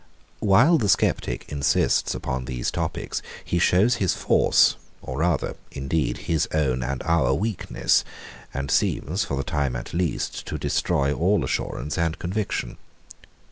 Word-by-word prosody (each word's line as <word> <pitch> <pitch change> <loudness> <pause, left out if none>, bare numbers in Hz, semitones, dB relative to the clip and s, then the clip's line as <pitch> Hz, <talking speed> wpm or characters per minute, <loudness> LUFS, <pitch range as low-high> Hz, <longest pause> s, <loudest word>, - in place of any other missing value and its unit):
While 120 - +5
the 105 -5 0
sceptic - - +1
insists 70 -2 +1
upon 65 0 -3
these 60 -1 -2
topics, - - -3 0.2
he 85 - 0
shows 105 +8 +4
his 95 -6 +1
force, - - +4 0.2
or 65 +2 -6
rather, 85 -2 0 0.2
indeed, 70 -2 -1
his 80 -2 +1
own 65 -5 +1
and 65 +2 -3
our 75 -6 +2
weakness; 105 +2 +1 0.5
and 70 0 -4
seems, 90 +10 +1
for 70 - -3
the 70 - -1
time 70 -7 -1
at 60 - -6
least, 85 -1 -2
to - - -3
destroy 70 +1 0
all 95 +7 +2
assurance 75 +6 -3
and 85 +1 0
conviction. 95 +4 -3
80 Hz, 140 wpm, -24 LUFS, 70-90 Hz, 0.5 s, While